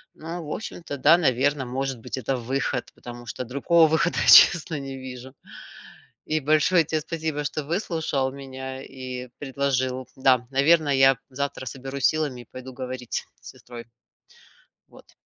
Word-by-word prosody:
но 165 +2 -7
в 150 - -9
общем-то 170 -8 -6
да, 150 +5 +6
наверное, 140 -2 +1
может 130 0 -3
быть, 110 - -6
это 130 +1 -2
выход, 130 +1 -2
потому 120 0 -10
что 125 - -5
другого 155 +6 +3
выхода 160 +2 +1
я, - - 0
честно, 160 -2 +7
не 135 -1 -7
вижу. 130 0 -9 0.9
И 155 0 0
большое 155 +4 +3
те 155 0 -2
спасибо, 160 -2 -3
что 150 +1 -3
выслушал 160 -5 -1
меня 130 -1 -8
и 130 -2 -8
предложил. 130 -2 -1
Да, 130 -2 +3
наверное, 145 +2 +3
я 135 -1 +5
завтра 140 0 -4
соберусь 135 +1 -4
силами 150 -6 0
и - - -14
пойду 130 0 -9
говорить 130 -1 -5 0.2
с - - -11
сестрой. 120 -1 -11 1.0
Вот. - - -19
135 Hz, 150 wpm, -24 LUFS, 130-155 Hz, 1.0 s, честно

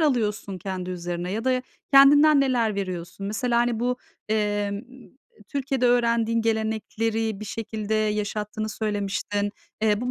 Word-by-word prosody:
alıyorsun 215 - 0
kendi 185 0 -4
üzerine 175 0 -4
ya 220 +3 -3
da 255 -1 +2 0.3
kendinden 285 +2 +8
neler 240 -6 +2
veriyorsun? 185 0 -4
Mesela, 235 +3 0
hani, 240 -1 +1
bu, 250 +1 +1 0.3
emm, 220 - +2 0.5
eee, 260 -1 -15 0.4
Türkiye'de 270 -3 0
öğrendiğin 235 -1 +2
gelenekleri 220 -1 -1
bir - - -5
şekilde 220 0 -3
yaşattığını 210 0 -1
söylemiştin. 205 -1 -2 0.3
Eee, 210 -1 +3
bu, 250 +1 -2
220 Hz, 130 wpm, -25 LUFS, 205-245 Hz, 0.5 s, kendinden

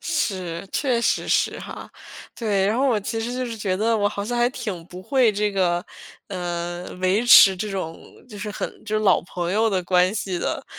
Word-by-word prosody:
是， 190 - -2
确 255 -5 +1
实 - - +1
是 - - +1
哈， - - -9 0.5
对。 205 -5 0
然 215 +4 +1
后 275 - +2
我 225 -5 +1
其 225 +3 -3
实 235 +2 -3
就 255 0 -2
是 230 -2 -5
觉 195 -3 -1
得 225 +3 +1
我 205 -1 +2
好 200 0 -5
像 240 +2 -2
还 240 0 +4
挺 205 -10 -5
不 180 +1 -10
会 255 0 +3
这 210 +1 0
个， 180 -3 0 0.4
呃， 175 -1 -4 0.2
维 190 +5 +2
持 195 -5 +9
这 210 +3 -3
种 185 -4 -5 0.3
就 210 -4 -10
是 210 +1 -5
很 - - -6
就 215 -1 -1
老 210 - +4
朋 175 0 -4
友 220 +2 +2
的 190 -3 0
关 180 +2 +2
系 190 -4 -2
的。 - - -3
205 Hz, 225 characters per minute, -23 LUFS, 185-225 Hz, 0.5 s, 持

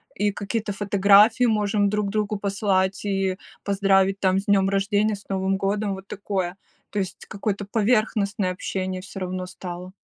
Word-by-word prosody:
И 205 +1 +1
какие-то 205 +1 -3
фотографии 205 +4 +5
можем 210 -2 +2
друг 210 0 -1
другу 210 0 -1
послать, 195 -1 0
и 195 -2 0 0.3
поздравить, 195 -1 +2
там, 190 -1 +2
с 195 - -7
днем 195 -1 +3
рождения, 205 +2 +1
с 200 - -14
Новым 190 0 0
годом, 200 +1 -1
вот 190 +1 -11
такое, 190 -3 -3 0.3
то 205 - -2
есть 190 -1 -5
какое-то 200 0 -3
поверхностное 210 -2 +1
общение 185 0 -3
всё 190 +1 -9
равно 185 0 -4
стало. 180 0 -8
200 Hz, 155 wpm, -24 LUFS, 190-205 Hz, 0.3 s, фотографии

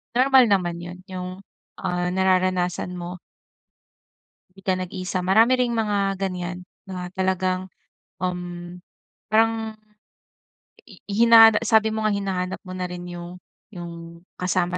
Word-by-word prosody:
Normal 260 0 +6
naman 180 -4 +1
'yon, 175 +1 -8
yung, 185 -1 -5 0.5
ah, 180 -1 -1
nararanasan 185 -1 +1
mo. 180 +1 -6 1.4
‘Di 195 - -15
ka 185 - +1
nag-iisa. 185 +1 -3
Marami 225 +7 +5
ring 245 -1 +1
mga 205 -3 0
ganiyan, 180 -2 -3 0.2
mga 185 -1 -5
talagang 185 0 0 0.6
um 175 -1 -4 0.5
parang 220 0 +1 1.1
i 200 -7 -16
i - - -3
hinana 225 -2 +9
sabi 220 -1 +4
mo 220 0 -2
nga 215 - +2
hinahanap 190 -2 -2
mo 185 -2 -9
na 180 - -2
rin 180 0 -7
yung, 175 +1 -8 0.3
yung 170 -1 -9 0.2
kasama 180 0 0
185 Hz, 125 wpm, -23 LUFS, 180-210 Hz, 1.4 s, hinana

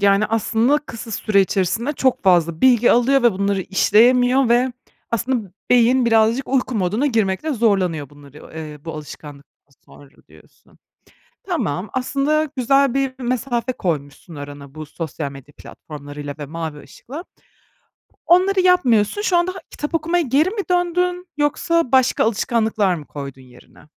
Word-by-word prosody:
Yani, 200 +1 +3
aslında, 225 +5 +1
kısa 230 -5 -10
süre 210 -1 +1
içerisinde 200 +7 0
çok 265 -3 0
fazla 170 -3 +3
bilgi 245 -2 +5
alıyor 260 +3 +3
ve 240 -2 +4
bunları 200 +1 -1
işleyemiyor 245 +7 +3
ve 245 +2 +2 0.4
aslında 230 -3 -2 0.2
beyin 250 +1 +4
birazcık 225 +3 +2
uyku 260 -1 0
moduna 210 +7 0
girmekte 225 +4 0
zorlanıyor 190 - 0
bunları, 145 -1 -16 0.2
eee, 150 -2 -8
bu 165 - -5
alışkanlıktan 145 -2 -12
sonra 145 - -16 0.2
diyorsun. 80 0 -22 0.7
Tamam, 180 +8 -3
aslında, 280 +4 0
güzel 275 +1 +2
bir 270 -1 -1
mesafe 245 0 -2
koymuşsun 155 - -5
arana 145 -1 -10
bu 155 0 -8
sosyal 155 -2 -6
medya 140 +1 -14
platformlarıyla 145 -1 -9
ve 145 - -6
mavi 160 -1 -6
ışıkla. 295 +8 -10 1.0
Onları 375 +3 +4
yapmıyorsun. 360 - +3
Şu 370 -4 +2
anda 345 +2 +1 0.2
kitap 295 +3 -5
okumaya 335 +2 +1
geri 285 +5 +2
mi 415 +1 -3
döndün 360 +1 0
yoksa 300 0 0
başka 260 -1 +3
alışkanlıklar 220 -3 0
mı 155 -3 -9
koydun 140 -2 -8
yerine? 125 -1 -19
225 Hz, 140 wpm, -20 LUFS, 165-270 Hz, 1.0 s, bilgi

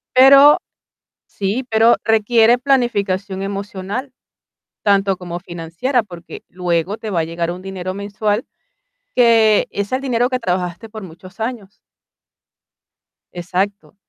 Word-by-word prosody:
Pero 275 +3 +8 0.7
sí, 205 +6 -3
pero 225 +1 +5
requiere 225 +2 +4
planificación 205 -8 0
emocional 200 +5 -5 0.7
tanto 195 -2 +2
como 175 -1 -6
financiera, 175 +9 -2
porque 175 -4 -11
luego 180 +2 -2
te 220 - -6
va 170 -4 0
a - - -1
llegar 170 +1 -3
un 180 +1 -8
dinero 185 -1 -5
mensual 205 +2 -2 0.7
que 225 -3 +4
es 200 +2 -4
el 260 - 0
dinero 245 -2 0
que 255 -1 -1
trabajaste 180 +1 -3
por 215 -2 -9
muchos 185 +4 -13
años. 225 -4 -4 1.6
Exacto. 190 +4 -3
200 Hz, 120 wpm, -18 LUFS, 185-230 Hz, 1.6 s, Pero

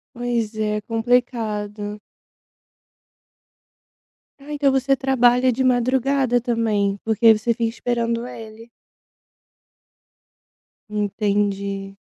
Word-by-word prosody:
Pois 235 -2 -2
é, 210 -1 -1
complicado. 220 -3 -1 2.4
Ah, 290 +2 -10
então 285 -2 +2
você 270 +1 +2
trabalha 255 -1 +3
de 260 +3 -1
madrugada 255 0 +2
também, 220 -4 0
porque 225 0 +5
você 225 +2 0
fica 235 0 -2
esperando 235 0 -2
ele. 225 -1 -11 2.2
Entendi. 200 -1 -2
230 Hz, 80 wpm, -21 LUFS, 210-250 Hz, 2.4 s, porque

